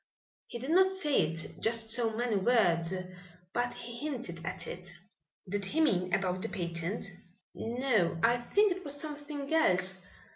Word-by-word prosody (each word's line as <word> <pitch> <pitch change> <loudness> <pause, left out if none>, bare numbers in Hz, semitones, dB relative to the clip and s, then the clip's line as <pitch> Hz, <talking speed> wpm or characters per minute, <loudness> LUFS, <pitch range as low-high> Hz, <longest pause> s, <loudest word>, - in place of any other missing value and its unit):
He - - -6
did 260 +6 -4
not 375 +2 +6
say 310 - +2
it 165 +1 -4
in - - -12
just 225 0 +2
so 230 -2 +1
many 240 -2 +1
words 185 -6 +3 0.6
but 245 0 0
he 235 0 -7
hinted 180 - -6
at 175 - -5
it." 180 -1 -8 0.6
"Did 200 +2 -2
he 290 +11 -1
mean 185 - +2
about 185 0 0
the - - -3
patent?" 170 +4 -2 0.5
"No, 225 -8 0
I 235 +1 +5
think 405 - +3
it 370 +1 -3
was 285 -2 -2
something 290 -1 -5
else. 190 - +3
230 Hz, 160 wpm, -31 LUFS, 185-285 Hz, 0.6 s, not